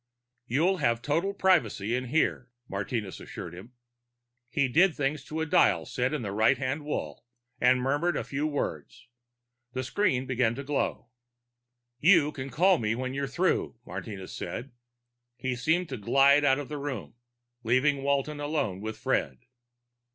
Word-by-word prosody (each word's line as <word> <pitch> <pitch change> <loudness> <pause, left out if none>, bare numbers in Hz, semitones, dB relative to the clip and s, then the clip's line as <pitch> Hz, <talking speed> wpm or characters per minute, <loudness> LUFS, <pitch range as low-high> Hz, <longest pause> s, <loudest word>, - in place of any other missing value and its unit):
"You'll 165 +10 +2
have 120 -6 +1
total 165 +7 0
privacy 125 - +2
in 130 +1 -2
here," 130 -2 0 0.2
Martinez 100 +1 -4
assured 85 - -8
him. 100 +8 -11 0.8
He 140 -2 +1
did 165 +7 +4
things 140 0 -1
to 160 +1 -4
a - - 0
dial 90 - +3
set 125 +1 -1
in 150 -5 -2
the 100 - -3
right 110 +6 +3
hand 130 +4 -2
wall, 75 - -4 0.4
and 125 +1 +4
murmured 145 +5 +1
a - - -2
few 145 +2 -2
words. 125 - -4 0.7
The 130 - -2
screen 135 -3 +1
began 125 -3 +1
to 140 - -5
glow. 140 -3 -2 0.9
"You 160 -1 +5
can 135 -2 -6
call 175 +8 +4
me 110 0 0
when 130 +1 -3
you're 140 0 -2
through," 175 +2 0
Martinez 100 -5 -7
said. 120 +10 -5 0.6
He 125 +1 -2
seemed 160 +8 +1
to 130 - -4
glide 140 +7 +4
out 135 -2 +4
of 145 -2 -5
the 150 -1 -5
room, 140 -7 -5 0.5
leaving 130 +5 +2
Walton 140 +2 0
alone 145 -11 -2
with 110 +1 -5
Fred. 65 -2 -1
135 Hz, 160 wpm, -28 LUFS, 120-150 Hz, 0.9 s, You